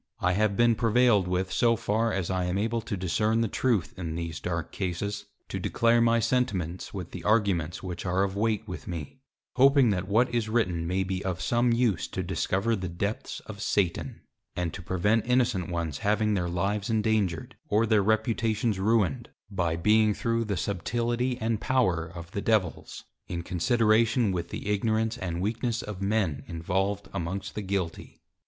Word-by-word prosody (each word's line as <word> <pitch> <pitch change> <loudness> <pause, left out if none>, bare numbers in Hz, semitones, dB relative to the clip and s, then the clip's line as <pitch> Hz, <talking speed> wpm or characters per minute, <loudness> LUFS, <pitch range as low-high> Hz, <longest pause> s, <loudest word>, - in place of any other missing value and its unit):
I 90 - +2
have 100 +1 +1
been 120 0 +5
prevailed 115 -3 +3
with 90 +1 -1
so 115 +3 +3
far 115 +1 0
as 95 -3 -2
I 90 -1 0
am 90 +2 -1
able 115 +3 0
to 105 -2 -4
discern 105 +5 +1
the 115 - +1
Truth 115 -3 0
in 80 -3 -4
these 85 -2 -4
dark 85 -2 -3
Cases, 100 +2 -3 0.2
to - - -4
declare 115 0 +2
my 115 0 +4
Sentiments, 95 -8 -1
with - - -6
the - - -7
Arguments 100 -7 +1
which 90 -2 -5
are 90 +1 +1
of 95 -1 -2
weight 110 +1 0
with 90 -7 -7
me, 85 - -6 0.4
hoping 135 -2 +6
that 95 -1 -2
what 120 +5 +2
is 115 -2 0
written 90 -8 0
may 95 +2 0
be 95 0 -3
of 90 -2 -2
some 120 0 +2
use 115 -9 +1
to 95 - -4
discover 95 +5 0
the 95 -3 -4
Depths 100 +5 -4
of 105 -1 -9
Satan; 95 -5 -1 0.3
and 90 -2 -2
to 95 - -6
prevent 100 +6 +1
innocent 120 -8 +1
ones 85 -4 -3
having 105 +1 +1
their 90 -3 0
Lives 100 +4 -1
endangered, 105 -7 0
or 110 +2 +3
their 110 -2 +3
Reputations 110 0 +1
ruined, 100 -6 +1 0.2
by 85 -4 0
being 105 +4 +3
through 115 -2 0
the 100 -3 -2
Subtility 120 +7 -1
and 110 -2 -1
Power 95 -11 +1
of 85 0 -10
the 100 - -3
Devils, 105 -7 -1 0.2
in 85 -1 -4
consideration 110 +4 +2
with 85 -2 -3
the - - -6
Ignorance 110 +3 0
and 85 -3 -3
Weakness 115 +3 -1
of 105 -2 -7
Men, 100 -7 0
involved 95 +4 -2
amongst 95 +1 -4
the 105 - -4
Guilty. 95 -4 -4
100 Hz, 175 wpm, -27 LUFS, 90-115 Hz, 0.4 s, hoping